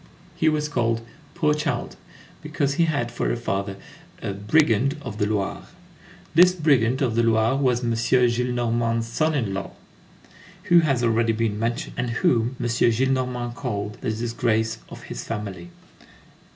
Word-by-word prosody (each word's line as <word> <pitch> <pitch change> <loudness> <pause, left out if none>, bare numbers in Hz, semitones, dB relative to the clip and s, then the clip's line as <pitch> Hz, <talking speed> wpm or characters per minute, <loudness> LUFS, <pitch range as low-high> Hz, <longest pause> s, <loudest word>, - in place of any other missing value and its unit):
He 160 -2 +3
was 150 -1 0
called 115 -5 -1 0.3
"poor 150 -1 +2
child," 150 0 -2 0.5
because 140 0 -1
he 165 +4 +3
had 140 -7 -1
for 120 - -1
a - - 0
father 100 -4 -2 0.4
"a 100 - -4
brigand 125 +5 +2
of 115 -5 -7
the 105 - +2
Loire." 100 -2 -2 0.7
This 180 +2 +7
brigand 135 -6 +2
of 120 -4 +1
the 115 - +2
Loire 115 +1 +3
was 130 -3 +1
M. 120 - 0
Gillenormand's 120 -1 +1
son 155 +7 0
in 110 -8 -1
law, 95 0 -5 0.9
who 175 0 +5
has 135 -7 +1
already 115 0 +2
been 110 -2 -1
mentioned, 115 +1 -2
and 125 0 -1
whom 115 +1 +1
M. - - -2
Gillenormand 125 +1 +1
called 105 -5 -4
"the 125 - -2
disgrace 110 0 -1
of - - -10
his - - -6
family." 100 -6 -6
120 Hz, 150 wpm, -24 LUFS, 110-135 Hz, 0.9 s, This